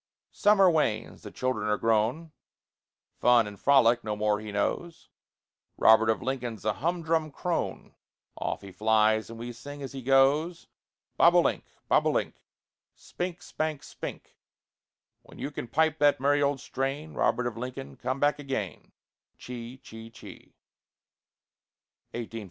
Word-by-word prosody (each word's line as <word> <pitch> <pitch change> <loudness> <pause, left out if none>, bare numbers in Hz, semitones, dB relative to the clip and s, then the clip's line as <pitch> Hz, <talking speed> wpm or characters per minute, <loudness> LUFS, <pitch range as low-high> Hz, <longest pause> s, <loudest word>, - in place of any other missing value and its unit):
Summer 205 -2 +4
wanes; 130 -10 0
the - - -9
children 130 -3 -2
are 105 0 +1
grown; 115 +9 0 0.9
Fun 120 -2 +5
and 105 -1 -9
frolic 120 -4 +4
no 105 -1 -2
more 105 0 +1
he 110 -1 -7
knows; 160 +11 -3 0.7
Robert 110 0 +6
of 110 - 0
Lincoln's 120 -5 -4
a 110 - +2
humdrum 165 - -1
crone; 175 +4 -3 0.4
Off - - -4
he 100 - -9
flies, 110 +1 +2
and 115 - -9
we 120 +1 -6
sing 145 +4 -9
as 135 - -6
he 135 - -6
goes: 140 +6 +3 0.5
Bob - - +6
o' - - +7
link, - - 0 0.2
bob - - +3
o' - - +4
link, - - -1 0.6
Spink, 175 -2 -6
spank, 155 -3 -3
spink; - - -9 0.8
When - - -16
you 145 - -4
can 125 - -6
pipe 160 +4 +1
that 145 -2 +4
merry 145 +2 +2
old 140 -1 +1
strain, 140 +4 -3
Robert 125 - +1
of 120 -3 -3
Lincoln, 130 +3 -6
come 130 +2 -3
back 145 +1 +2
again. 135 -9 -5
135 Hz, 135 wpm, -28 LUFS, 110-150 Hz, 0.9 s, o